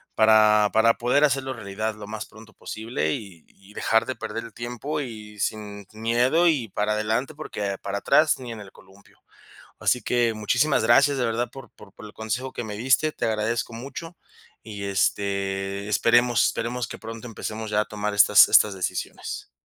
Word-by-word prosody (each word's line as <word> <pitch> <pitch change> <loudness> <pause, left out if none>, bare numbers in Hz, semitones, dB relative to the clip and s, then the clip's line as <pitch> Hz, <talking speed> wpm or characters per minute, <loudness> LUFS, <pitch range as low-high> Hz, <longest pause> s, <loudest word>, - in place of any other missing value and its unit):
para 110 -1 +5
para 115 +1 +5
poder 125 +5 +2
hacerlo 135 -1 -1
realidad 110 -1 -4
lo 105 -1 -10
más 110 0 -6
pronto 110 0 -16
posible, 115 +3 -3
y 100 - -10
y 100 +2 -20
dejar 115 +1 +1
de 130 - -4
perder 115 0 -5
el 115 - -12
tiempo 125 +6 -4
y 105 -5 -9
sin 105 -1 -3
n 110 0 -13
miedo 125 +9 +3
y 135 -9 +1
para 105 +2 -1
adelante 110 +7 -1
porque 100 -10 -4
para 100 0 -3
atrás, 155 -2 +3
ni 125 -2 -7
en 110 - -9
el 95 - -12
columpio. 95 +1 -21 0.6
Así 125 - +2
que 120 -2 +1
muchísimas 120 +7 +1
gracias 140 +5 +5
de 125 - 0
verdad 115 +1 -1
por 135 -3 -12
por 100 - -16
por - - -12
el 105 - -12
consejo 120 +4 -4
que - - -5
me 105 -1 -6
diste, 130 +7 +2
te - - -4
agradezco 115 +1 -1
mucho, 140 +8 -8 0.5
y 100 -3 -7
este, 100 0 -1
esperemos 120 +3 +3
esperemos 120 +1 -2
que 115 - -8
pronto 115 +2 -8
empecemos 110 -1 -6
ya 105 0 +2
a 105 - +1
tomar 105 0 -3
estas 100 - +7
estas 105 -2 +5
decisiones. 95 - -5
110 Hz, 185 wpm, -24 LUFS, 105-125 Hz, 0.6 s, estas